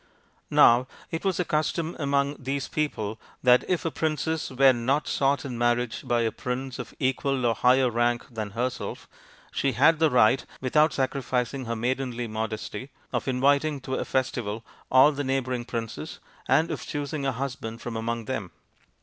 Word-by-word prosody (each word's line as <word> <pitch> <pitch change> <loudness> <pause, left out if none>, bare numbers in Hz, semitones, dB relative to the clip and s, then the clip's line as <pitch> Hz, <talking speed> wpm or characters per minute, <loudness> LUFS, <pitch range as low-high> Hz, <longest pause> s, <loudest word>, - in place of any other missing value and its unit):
Now 120 +2 +6 0.2
it 165 - -3
was 190 -3 +1
the 180 - 0
custom 155 +2 -1
among 140 0 +1
these 135 +1 -3
people 110 -8 -2 0.2
that 125 -1 +6
if 180 -3 0
a 165 - 0
princess 160 +2 -1
were 135 0 +5
not 130 +5 0
sought 140 +2 +1
in 125 -4 -5
marriage 120 0 +1
by 120 -1 +2
a 115 -1 +1
prince 130 +1 -4
of 120 -2 -7
equal 135 -1 0
or 115 - +3
higher 125 +3 +4
rank 120 0 +1
than 110 -3 -4
herself, 125 +1 -3 0.4
she 135 -1 0
had 160 -1 +4
the 160 -1 +4
right, 125 0 +4 0.2
without 150 +4 +3
sacrificing 130 -1 -1
her 115 0 -2
maidenly 120 0 -2
modesty, 110 +4 -4 0.2
of - - -1
inviting 140 +3 +2
to 130 - -5
a - - 0
festival 115 -4 -2 0.2
all 130 +3 +7
the 145 -1 -3
neighbouring 130 -2 -1
princes, 115 +6 -5 0.3
and 155 +5 +3
of - - -4
choosing 145 -1 -3
a 135 - +1
husband 120 -3 -5
from 120 -1 -6
among 115 0 -2
them. 110 -7 -3
130 Hz, 165 wpm, -26 LUFS, 120-140 Hz, 0.4 s, all